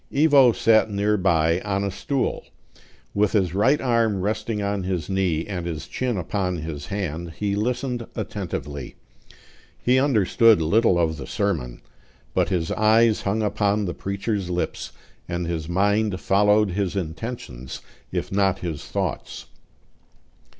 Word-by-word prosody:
Ivo 140 -4 +6
sat 110 -1 +3
near 105 +1 +1
by, 85 -3 +2
on 100 -1 -1
a 100 - -1
stool; 135 +7 -2 0.7
with 105 0 +1
his 95 -6 +2
right 130 +9 +3
arm 115 -6 +1
resting 105 +2 -2
on 100 -1 -1
his 90 -1 -3
knee, 90 -4 0
and 90 -4 -4
his 80 -3 -4
chin 125 -4 -2
upon 90 +1 -1
his 75 -2 -6
hand, 85 -3 -4
he 100 -1 -1
listened 120 +2 -2
attentively. 75 - -5 0.8
He 125 +1 +2
understood 115 -4 +4
little 90 +4 +3
of 80 -2 +1
the 65 - -7
sermon; 75 -13 -2 0.5
but - - +1
his 85 -4 -1
eyes 110 +1 +4
hung 105 +3 0
upon 105 0 +1
the 90 - -3
preacher's 100 -1 -3
lips, 90 0 -3 0.4
and 85 0 -2
his 85 -1 -3
mind 100 +2 +1
followed 105 +1 +3
his 100 0 -1
intentions 80 - -5 0.3
if - - -3
not 95 -1 +2
his 85 -6 -5
thoughts. - - -4
100 Hz, 140 wpm, -23 LUFS, 85-110 Hz, 0.8 s, Ivo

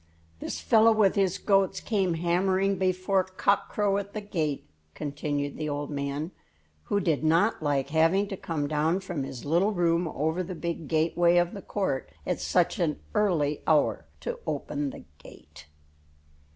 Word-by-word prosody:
"This - - -4
fellow 225 -1 +5
with 210 -3 +4
his 195 -2 +1
goats 195 -2 +2
came 190 -6 0
hammering 185 +3 +1
before 185 +1 +1
cock 190 +2 0
crow 200 -1 +1
at 200 0 -8
the 215 - -4
gate," 160 - -2 0.3
continued 145 -1 -3
the 155 -1 -3
old 145 +1 -3
man, 140 +3 -3 0.5
who 205 - +1
did 165 -6 0
not 165 +7 +3
like 140 -2 0
having 165 +6 +3
to 195 - -3
come 155 -5 -3
down 155 +5 +1
from 175 -6 -4
his 135 -2 -6
little 175 +8 +2
room 170 -1 +1
over 160 +3 -1
the 185 0 -5
big 170 -2 -4
gateway 170 +2 +3
of 175 0 +2
the 200 - -7
court 165 - -2 0.2
at - - -1
such - - +1
an 155 -4 0
early 170 -9 +1
hour 155 -2 +2
to - - -4
open 145 -1 -2
the - - -10 0.2
gate. 75 - -15
170 Hz, 165 wpm, -27 LUFS, 150-195 Hz, 0.5 s, fellow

